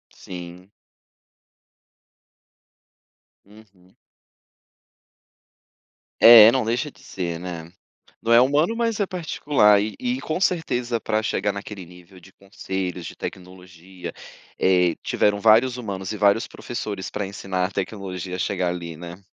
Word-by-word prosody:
Sim. 90 Hz, +1 st, -10 dB, 2.7 s
Uhum. 100 Hz, -3 st, -21 dB, 2.3 s
É, 115 Hz, -1 st, +10 dB
não 130 Hz, -2 st, 0 dB
deixa 120 Hz, +6 st, -1 dB
de -, -, -22 dB
ser, 85 Hz, -3 st, -5 dB
né. 85 Hz, -2 st, -7 dB, 0.5 s
Não 115 Hz, -, +1 dB
é 115 Hz, -, +8 dB
humano, 150 Hz, -, +2 dB
mas 230 Hz, -2 st, -1 dB
é 200 Hz, -, +1 dB
particular 145 Hz, -, +2 dB
e 110 Hz, -, -5 dB
e 250 Hz, +1 st, -2 dB
com 155 Hz, +3 st, -3 dB
certeza 125 Hz, -11 st, 0 dB
para 110 Hz, 0 st, -1 dB
chegar 105 Hz, -, -1 dB
naquele 100 Hz, -1 st, -8 dB
nível 90 Hz, +1 st, -16 dB
de 95 Hz, +2 st, -18 dB
conselhos, 95 Hz, -2 st, -5 dB
de -, -, -9 dB
tecnologia, 90 Hz, 0 st, -9 dB, 0.5 s
eh, 90 Hz, -2 st, +3 dB
tiveram 105 Hz, 0 st, +1 dB
vários 115 Hz, +4 st, +4 dB
humanos 100 Hz, -4 st, -5 dB
e -, -, -5 dB
vários 100 Hz, +2 st, +3 dB
professores 105 Hz, -5 st, -6 dB
pra 105 Hz, -1 st, -3 dB
ensinar 95 Hz, -1 st, -3 dB
a 95 Hz, -, -2 dB
tecnologia 95 Hz, -2 st, -5 dB
a -, -, -9 dB
chegar 90 Hz, 0 st, -1 dB
ali, 85 Hz, -2 st, -5 dB
né. 85 Hz, +3 st, -10 dB
100 Hz, 125 wpm, -23 LUFS, 90-115 Hz, 2.7 s, É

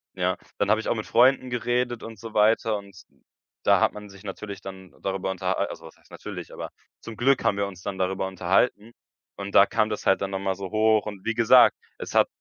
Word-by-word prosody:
ja, 90 Hz, 0 st, 0 dB, 0.2 s
dann 100 Hz, -, 0 dB
habe 110 Hz, +1 st, +3 dB
ich -, -, -7 dB
auch -, -, +1 dB
mit 110 Hz, -, -4 dB
Freunden 130 Hz, +2 st, +4 dB
geredet 120 Hz, 0 st, -1 dB
und 115 Hz, -2 st, -9 dB
so 115 Hz, 0 st, -9 dB
weiter 110 Hz, 0 st, +3 dB
und 100 Hz, -2 st, -12 dB, 0.6 s
da -, -, +5 dB
hat -, -, +2 dB
man 105 Hz, -1 st, -10 dB
sich 100 Hz, +1 st, -15 dB
natürlich 100 Hz, 0 st, -7 dB
dann 95 Hz, -1 st, -10 dB
darüber 95 Hz, 0 st, -2 dB
unterh 95 Hz, 0 st, -1 dB
also, -, -, -4 dB
was -, -, -13 dB
heißt -, -, -27 dB
natürlich, -, -, -8 dB
aber -, -, -6 dB, 0.3 s
zum 115 Hz, -, -9 dB
Glück 135 Hz, +2 st, +2 dB
haben 100 Hz, -, +1 dB
wir 100 Hz, -, 0 dB
uns 95 Hz, -3 st, -11 dB
dann 95 Hz, -, -4 dB
darüber 95 Hz, +1 st, -1 dB
unterhalten 95 Hz, +4 st, 0 dB, 0.5 s
und 100 Hz, 0 st, -6 dB
da 100 Hz, -, +8 dB
kam 110 Hz, +1 st, 0 dB
das 105 Hz, -, -5 dB
halt 95 Hz, -, +3 dB
dann 100 Hz, -, -2 dB
noch 95 Hz, -, -2 dB
mal 95 Hz, -1 st, -1 dB
so 95 Hz, -1 st, -7 dB
hoch 110 Hz, 0 st, +3 dB
und 105 Hz, -3 st, -8 dB
wie 115 Hz, -, 0 dB
gesagt, 115 Hz, -2 st, +6 dB, 0.2 s
es -, -, -7 dB
hat -, -, +5 dB
100 Hz, 230 wpm, -25 LUFS, 95-110 Hz, 0.6 s, da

